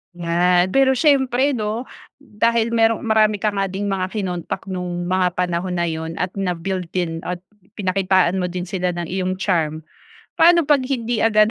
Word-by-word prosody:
Yan, 175 +1 +2
pero 265 +2 +4
siyempre 265 -1 +3
'no, 220 -1 -2 0.3
dahil 230 -3 0
merong 225 -1 +2
marami 215 -2 +2
ka 215 - +2
nga 195 -1 -1
ding 195 +2 -3
mga 185 -1 -1
kinontak 180 -5 -3
nung 180 -1 -3
mga 180 0 0
panahon 180 0 -1
na 170 - 0
yun 160 +1 -5
at 180 +2 -2
na-build 180 0 -2
din 165 -3 -1
at 180 0 -4 0.3
pinakitaan 190 -2 +1
mo 180 - -1
din 180 0 -4
sila 180 -1 -2
ng 175 0 -3
iyong 185 0 -1
charm. 160 -5 -1 0.6
Paano 340 +1 +6
'pag 290 -2 +3
hindi 240 -3 -2
agad 215 -1 +4
190 Hz, 165 wpm, -20 LUFS, 180-225 Hz, 0.6 s, Paano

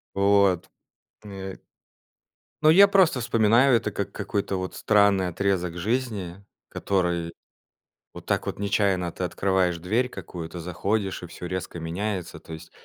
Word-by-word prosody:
Вот, 100 -2 +3 0.6
э 95 -2 -7 1.1
Ну, 155 - +5
я 195 +5 +8
просто 185 -10 +3
вспоминаю 115 +3 +4
это 115 - -1
как - - -4
какой-то 100 -1 -2
вот 95 0 -4
странный 100 -3 +3
отрезок 90 -1 -1
жизни, 100 -3 -3 0.2
который- 85 -3 -1 0.8
вот - - -11
так - - 0
вот - - -5
нечаянно 100 -3 +1
ты 95 - -6
открываешь 90 -1 0
дверь 110 +9 0
какую-то, 90 -5 -8
заходишь- 95 +3 -2
и - - -6
всё 90 +1 -8
резко 90 -1 -5
меняется. 90 +2 -4
То 80 - -11
есть 80 0 -10
95 Hz, 135 wpm, -25 LUFS, 90-105 Hz, 1.1 s, я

